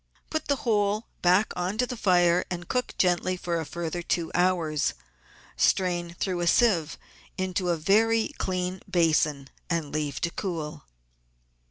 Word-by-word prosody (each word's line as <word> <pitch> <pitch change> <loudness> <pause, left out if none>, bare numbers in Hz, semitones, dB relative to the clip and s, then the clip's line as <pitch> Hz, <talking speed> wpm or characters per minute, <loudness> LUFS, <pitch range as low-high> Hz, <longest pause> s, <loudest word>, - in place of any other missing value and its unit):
Put 315 - -2
the 285 - +2
whole 210 -1 +1 0.2
back 185 +4 +3
on 180 +4 -2
to 250 - +2
the 250 - -5
fire 180 -5 +3
and 175 -1 -5
cook 250 -1 -2
gently 180 0 +1
for 170 -1 -2
a 160 - -4
further 170 0 -4
two 170 -1 -1
hours. 170 - +1 0.6
Strain 175 -2 +1
through 185 -3 -1
a 175 - 0
sieve 170 -7 +3 0.4
into 185 -1 -1
a 170 - +1
very 220 +7 +3
clean 185 0 -2
basin 155 -5 +1 0.2
and 165 -4 -1
leave 150 -3 -2
to 170 - 0
cool. 165 -7 -5
180 Hz, 150 wpm, -27 LUFS, 170-195 Hz, 0.6 s, back